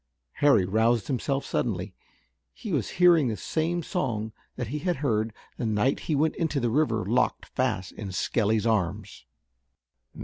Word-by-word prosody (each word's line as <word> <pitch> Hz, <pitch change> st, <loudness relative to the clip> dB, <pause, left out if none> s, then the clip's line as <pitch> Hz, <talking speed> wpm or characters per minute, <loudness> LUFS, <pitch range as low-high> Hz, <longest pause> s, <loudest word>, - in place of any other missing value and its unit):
Harry 140 Hz, -10 st, +5 dB
roused 110 Hz, +2 st, +2 dB
himself 135 Hz, +3 st, -1 dB
suddenly. 95 Hz, -4 st, -2 dB, 0.6 s
He -, -, -6 dB
was -, -, 0 dB
hearing 175 Hz, -5 st, +6 dB
the 110 Hz, -3 st, -2 dB
same 165 Hz, -, -1 dB
song 115 Hz, -, -2 dB, 0.2 s
that 125 Hz, -4 st, -4 dB
he 150 Hz, +4 st, -3 dB
had 175 Hz, +3 st, 0 dB
heard 115 Hz, -6 st, 0 dB, 0.3 s
the -, -, -2 dB
night 110 Hz, +5 st, +1 dB
he 155 Hz, -, +3 dB
went 155 Hz, +2 st, +1 dB
into 160 Hz, -4 st, 0 dB
the 120 Hz, -3 st, 0 dB
river 115 Hz, -7 st, +1 dB
locked 120 Hz, +6 st, +1 dB
fast 95 Hz, +2 st, -2 dB
in 100 Hz, -4 st, -7 dB
Skelly's 110 Hz, +3 st, +1 dB
arms. 105 Hz, -2 st, -1 dB
115 Hz, 150 wpm, -27 LUFS, 105-145 Hz, 0.6 s, hearing